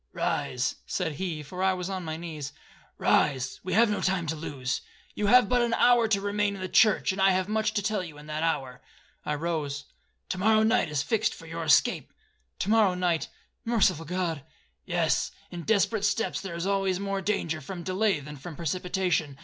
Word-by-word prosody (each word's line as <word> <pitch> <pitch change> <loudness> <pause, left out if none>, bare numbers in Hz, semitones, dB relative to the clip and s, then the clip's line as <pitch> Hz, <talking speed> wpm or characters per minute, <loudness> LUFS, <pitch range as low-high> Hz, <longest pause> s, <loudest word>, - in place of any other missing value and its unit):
'Rise,' 125 0 -1
said 180 -4 -1
he, 165 -5 -3
for 180 +6 -7
I 190 0 +3
was 180 -1 -4
on 190 -2 -4
my 160 -1 -4
knees; 155 -4 -6 0.4
'rise,—we 140 +5 +1
have 230 +4 +5
no 210 - -1
time 185 -2 0
to 160 +1 -2
lose. 135 -5 -3 0.3
You 210 - -1
have 250 +4 +6
but 250 -1 +2
an 235 -1 +1
hour 240 -2 +5
to 210 -2 +2
remain 205 0 0
in 190 - -8
the 185 - -2
church, 215 +2 +4
and 190 +1 -3
I 195 - +6
have 185 0 +1
much 215 0 0
to 205 - 0
tell 210 -2 0
you 160 -4 -9
in 150 - -12
that 155 0 -4
hour.' 140 -6 -1 0.5
I 150 - 0
rose. 145 -3 -3 0.4
'To 185 - -3
morrow 215 +2 +4
night 225 -6 +2
is 145 -2 -1
fixed 220 -2 0
for 165 - -13
your 165 +1 -5
escape.'—'To 430 - 0
morrow 215 -5 +4
night,—merciful 180 +1 -1
God!'—'Yes; 155 - -2 0.2
in 175 - -6
desperate 215 +2 +1
steps 210 +2 0
there 190 -4 -6
is 170 +1 -3
always 195 -2 +1
more 195 0 -2
danger 170 -5 -1
from 175 +5 -7
delay 190 -1 +1
than 150 +1 -9
from 155 +4 -8
precipitation. 175 -2 -1
185 Hz, 190 wpm, -27 LUFS, 155-205 Hz, 0.5 s, have